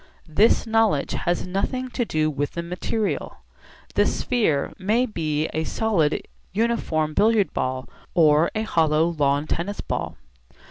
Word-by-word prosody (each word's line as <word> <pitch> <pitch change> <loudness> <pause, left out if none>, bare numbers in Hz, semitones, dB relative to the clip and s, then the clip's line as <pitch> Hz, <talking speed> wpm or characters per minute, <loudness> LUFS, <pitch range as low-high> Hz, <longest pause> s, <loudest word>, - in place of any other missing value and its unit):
This 200 +8 +3
knowledge 225 -10 +2
has 175 0 -1
nothing 200 +8 -2
to 245 -1 -1
do 155 -5 0
with 145 0 -3
the 170 - -3
material; 180 +5 -3 0.6
the - - +3
sphere 210 - 0
may 215 +6 +2
be 155 -8 -1
a 160 - -1
solid 170 -5 0 0.3
uniform 185 -8 0
billiard 215 +2 +3
ball 130 0 -2 0.3
or 155 -1 +5
a 215 - 0
hollow 160 -4 +2
lawn 145 -3 +1
tennis 180 +6 -3
ball. - - -3
170 Hz, 135 wpm, -23 LUFS, 155-220 Hz, 0.6 s, or